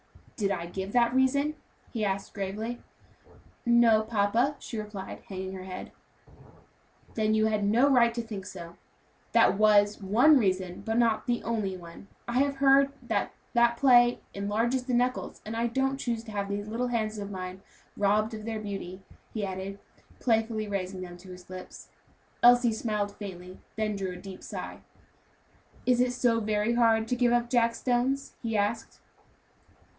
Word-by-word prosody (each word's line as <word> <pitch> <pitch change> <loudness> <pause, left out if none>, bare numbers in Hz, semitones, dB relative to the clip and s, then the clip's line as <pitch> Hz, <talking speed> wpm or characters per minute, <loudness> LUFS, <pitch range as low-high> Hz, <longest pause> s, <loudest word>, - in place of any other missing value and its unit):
"Did 200 -3 0
I 180 -4 -2
give 190 +3 -5
that 240 -1 +3
reason?" 280 +3 +2 0.4
he 225 -3 -2
asked 195 -1 -2
gravely. 215 +4 -4 0.8
"No, 235 -2 +5
papa," 225 +5 +1
she 230 -4 -6
replied, 210 -2 -7
hanging 190 -1 -5
her 185 -1 -7
head. 185 -1 -7 1.2
"Then 215 -1 +1
you 215 0 +3
had 215 -1 +1
no 230 +7 +4
right 245 -4 +5
to 235 - -2
think 205 -4 -7
so. 170 -2 -9 0.6
That 195 - +4
was 210 -1 +4
one 245 +10 +5
reason, 185 -4 -1
but 225 +1 -1
not 230 -1 +2
the 240 -1 0
only 210 -5 -2
one. 170 +2 -12 0.2
I 240 +1 +1
have 280 0 +2
heard 275 0 +5
it - - -12
said - - -18
that - - 0 0.2
that 235 -1 +3
play 245 -2 +5
enlarges 225 +6 -1
the 250 -2 0
knuckles, 250 +1 -1
and 220 +1 -5
I 230 +1 +1
don't 270 +3 0
choose 235 -4 -2
to 225 - -10
have 200 -1 -3
these 205 +1 -3
little 235 +3 -2
hands 220 -3 -2
of 200 0 -5
mine 185 -1 -6 0.3
robbed 210 +2 +1
of 215 -1 -6
their 220 0 -3
beauty," 195 -3 -6 0.3
he 215 -2 -1
added, 190 +1 -5 0.4
playfully 225 -2 0
raising 190 -2 -3
them 175 -1 -8
to 185 +1 -14
his 180 -1 -12
lips. 185 0 -10 0.5
Elsie 245 -1 +6
smiled 210 -2 -2
faintly, 185 -3 -9 0.2
then 215 -1 -1
drew 190 -2 -3
a - - -8
deep 190 -1 -10
sigh. - - -7 1.1
"Is 250 -1 +3
it 250 0 +1
so 240 -2 +2
very 215 +1 0
hard 225 -2 +3
to 250 - +1
give 245 -1 +2
up 240 0 +1
jack 230 -2 +3
stones?" 255 +3 0
he 225 -2 -1
asked. 210 +3 -2
220 Hz, 170 wpm, -28 LUFS, 200-240 Hz, 1.2 s, Elsie